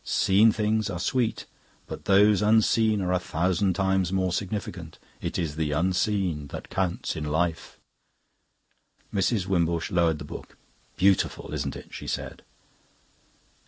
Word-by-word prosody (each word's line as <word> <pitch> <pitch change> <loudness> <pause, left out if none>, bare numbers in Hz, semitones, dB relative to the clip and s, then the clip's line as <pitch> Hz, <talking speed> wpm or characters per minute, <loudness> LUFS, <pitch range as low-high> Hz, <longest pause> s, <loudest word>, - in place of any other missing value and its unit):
Seen 105 +4 +4
things 110 0 0
are 90 - -3
sweet, 120 +3 -1 0.4
but - - -8
those 100 +1 +5
unseen 110 0 +3
are 90 - -1
a 90 - +2
thousand 90 +2 0
times 95 -2 +1
more 95 -2 0
significant. 95 -5 -4 0.2
It - - -3
is 80 -4 -3
the 75 -2 -1
unseen 90 -2 0
that - - -9
counts 95 -2 -2
in 75 - -4
Life.'" 80 +2 -2 1.4
Mrs. 100 0 +1
Wimbush 85 -3 0
lowered 85 -3 +2
the 70 - -8
book. - - -10 0.4
"Beautiful, 95 -5 +1
isn't 70 -2 -3
it?" - - -11
she - - -7
said. - - -4
95 Hz, 135 wpm, -26 LUFS, 85-100 Hz, 1.4 s, those